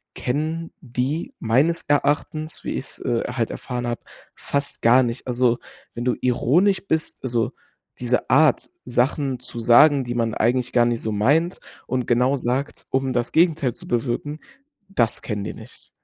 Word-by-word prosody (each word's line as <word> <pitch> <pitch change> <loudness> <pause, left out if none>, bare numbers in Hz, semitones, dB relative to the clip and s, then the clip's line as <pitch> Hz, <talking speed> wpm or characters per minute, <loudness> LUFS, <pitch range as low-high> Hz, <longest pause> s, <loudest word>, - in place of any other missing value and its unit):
kennen 155 +5 -2
die 140 - -3
meines 135 +9 +2
Erachtens, 150 +2 0
wie - - -3
ich's, - - -6
äh, 115 - -1
halt 120 -2 -2
erfahren 125 -1 -4
habe, 120 -1 -3 0.3
fast 140 0 -4
gar 125 +3 +6
nicht. 120 +1 -4
Also, 125 -1 +2 0.3
wenn 120 - -5
du 125 - +2
ironisch 170 - +2
bist, 160 0 -1
also 120 -3 0 0.5
diese 125 0 0
Art, 150 0 +4
Sachen 130 +2 0
zu 125 -1 -6
sagen, 135 +5 +6
die 120 -1 -4
man 115 -2 0
eigentlich 125 +3 +1
gar 120 -1 +5
nicht 120 -1 0
so 110 - -2
meint 145 - +2 0.3
und 125 -1 -2
genau 125 +3 +3
sagt, 130 +2 -3
um 130 0 0
das 120 0 -1
Gegenteil 160 -7 +3
zu - - -8
bewirken, 120 +5 -2 0.5
das 120 - 0
kennen 105 -3 -4
die - - -5
nicht. - - -13
125 Hz, 160 wpm, -23 LUFS, 120-145 Hz, 0.5 s, gar